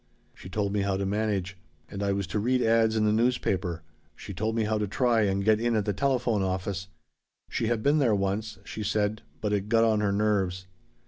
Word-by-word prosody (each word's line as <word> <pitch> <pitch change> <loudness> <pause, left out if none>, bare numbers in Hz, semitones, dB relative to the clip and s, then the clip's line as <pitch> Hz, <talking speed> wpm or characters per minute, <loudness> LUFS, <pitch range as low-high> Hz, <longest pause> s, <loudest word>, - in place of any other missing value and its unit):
She 90 - -12
told 100 +1 -1
me 105 - +1
how 100 -1 0
to 100 - -2
manage. 100 -3 -1 0.3
And 100 - -7
I 100 -1 +1
was 100 0 -1
to 105 - +1
read 125 +4 +1
'ads' 115 0 +3
in 110 -1 +2
the 105 - +3
newspaper. 100 -7 0 0.3
She 100 - -8
told 110 +4 -2
me 115 - +1
how 110 0 0
to 105 - -1
try 120 +2 +2
and 100 -1 0
get 110 0 +4
in 120 -1 +1
at 105 -2 +1
the 105 - 0
telephone 120 -1 +1
office. 95 0 -2 0.6
She 115 - -1
had 115 -2 0
been 145 +2 +3
there 120 -7 +3
once, 100 +2 -2
she 110 - -7
said, 105 +1 0 0.2
but 105 -1 -1
it 100 0 -1
'got 115 0 +4
on 110 -2 +3
her 105 -1 +1
nerves.' 100 -3 0
105 Hz, 220 wpm, -27 LUFS, 100-110 Hz, 0.6 s, get